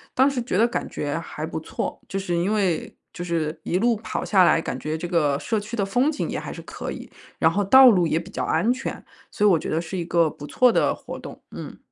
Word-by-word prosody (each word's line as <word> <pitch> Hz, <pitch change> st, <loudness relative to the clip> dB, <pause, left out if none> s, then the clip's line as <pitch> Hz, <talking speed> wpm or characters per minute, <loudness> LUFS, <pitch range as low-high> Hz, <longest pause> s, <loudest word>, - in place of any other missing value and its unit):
当 265 Hz, +2 st, +5 dB
时 270 Hz, -3 st, -2 dB
觉 235 Hz, -6 st, -2 dB
得 225 Hz, -, +5 dB
感 240 Hz, -, -3 dB
觉 145 Hz, +1 st, -3 dB
还 155 Hz, -2 st, -6 dB
不 160 Hz, -, -4 dB
错， 160 Hz, -, -5 dB
就 195 Hz, -, -4 dB
是 190 Hz, -2 st, -2 dB
因 185 Hz, +5 st, +1 dB
为 190 Hz, -6 st, -1 dB, 0.2 s
就 -, -, -9 dB
是 160 Hz, -2 st, -2 dB
一 180 Hz, -, 0 dB
路 235 Hz, +1 st, +2 dB
跑 215 Hz, -, -4 dB
下 190 Hz, -3 st, +4 dB
来， 165 Hz, -, +4 dB
感 130 Hz, -, -4 dB
觉 155 Hz, +3 st, -3 dB
这 175 Hz, +2 st, -5 dB
个 150 Hz, -5 st, +2 dB
社 220 Hz, +6 st, -1 dB
区 210 Hz, +3 st, -6 dB
的 200 Hz, -4 st, 0 dB
风 245 Hz, +8 st, +2 dB
景 310 Hz, -, -3 dB
也 -, -, -3 dB
还 -, -, -7 dB
是 -, -, -8 dB
可 -, -, -7 dB
以， -, -, -7 dB, 0.3 s
然 -, -, +3 dB
后 205 Hz, -, 0 dB
道 260 Hz, +5 st, +9 dB
路 180 Hz, -7 st, +3 dB
也 160 Hz, -, +1 dB
比 175 Hz, +4 st, -6 dB
较 -, -, -3 dB
安 230 Hz, -, +2 dB
全， 260 Hz, +2 st, -4 dB, 0.3 s
所 210 Hz, -, 0 dB
以 -, -, +7 dB
我 170 Hz, -4 st, +4 dB
觉 -, -, -5 dB
得 160 Hz, +2 st, 0 dB
是 175 Hz, +3 st, -6 dB
一 175 Hz, -, -3 dB
个 170 Hz, -1 st, +2 dB
不 145 Hz, 0 st, -10 dB
错 250 Hz, +8 st, +4 dB
的 -, -, +2 dB
活 -, -, -8 dB
动， -, -, -10 dB
嗯。 -, -, -8 dB
185 Hz, 285 characters per minute, -24 LUFS, 165-225 Hz, 0.3 s, 道